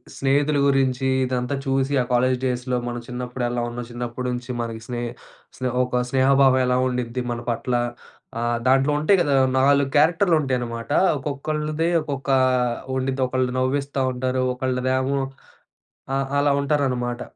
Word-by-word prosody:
స్నేహితుల 145 +2 +1
గురించి 135 -1 +1 0.2
ఇదంతా 125 +1 -2
చూసి 135 +1 0
ఆ - - +1
కాలేజ్ 130 +1 +3
డేస్‌లో 125 0 -1
మనం 120 0 -3
చిన్నప్పుడు 125 0 -5
ఎలా 120 0 -2
ఉన్నాం, 120 0 -6
చిన్నప్పటి 120 +1 -4
నుంచి 125 +1 -5
మనకి 115 -1 -5
స్నే 120 -1 -4 0.6
స్నే 130 0 -1
ఒక 125 0 0
స్నేహభావం 135 0 +4
ఎలా 125 0 +2
ఉండిద్ది 125 0 -2
మన 120 - -3
పట్ల. 120 +2 -2 0.7
ఆహ్, 120 0 0
దాంట్లో 135 +2 +4
ఉంటాయి 190 +6 +4
గదా 145 -4 +2 0.2
నాలుగు 140 0 +3
క్యారెక్టర్‌లు 165 +3 +4
ఉంటాయి 130 -2 0
అన్నమాట. 115 +2 -5 0.3
ఒక్కొక్కళ్ళది 150 +3 -2
ఒక్కొక్క 140 -2 -3 0.7
ఉండిది. 130 +1 -1
ఒకళ్ళు 130 0 0
నవ్విస్తా 140 +1 -1
ఉంటారు. 130 +1 -1
ఒకళ్ళదేమో 130 +1 0 1.0
ఆ! - - +1 0.2
అలా 145 0 +3
ఉంటారనమాట. 130 -4 -1
130 Hz, 140 wpm, -23 LUFS, 125-140 Hz, 1.0 s, స్నేహభావం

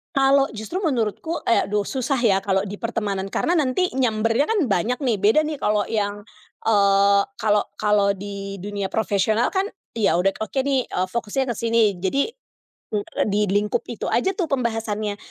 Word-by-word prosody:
Kalau 275 0 +4
justru 220 - -4
menurutku 305 - -1
eh, 230 - +3
aduh 205 +1 0
susah 265 +5 -1
ya 210 -5 +4
kalau 195 0 0
di 205 0 -7
pertemanan 210 -4 -2
karena 340 - 0
nanti 305 +5 +1
nyambernya 230 +1 +1
kan 445 -2 +1
banyak 220 +5 0
nih, 240 -5 +1
beda 220 +10 +4
nih 305 -1 -3
kalau 210 0 +1
yang, 205 -2 -2 0.4
eee, 200 -2 +4 0.2
kalau 210 -1 +2
kalau 205 -1 +2
di 200 0 -6
dunia 200 -1 -3
profesional 220 +2 +1
kan, 385 0 +1 0.3
ya 210 -6 +3
udah 190 +2 +2
oke 220 +5 -2
nih, 270 -2 0
eee, 185 +1 -1
fokusnya 235 +3 -1
ke - - -4
sini. 230 0 +2 0.2
Jadi, 195 +9 +1 0.7
e - - +2 0.3
di 210 0 +1
lingkup 205 +1 +1
itu 235 - -5
aja 375 +11 +1
tuh 365 - +1
pembahasannya, 220 -6 -2
215 Hz, 170 wpm, -22 LUFS, 200-255 Hz, 0.7 s, Kalau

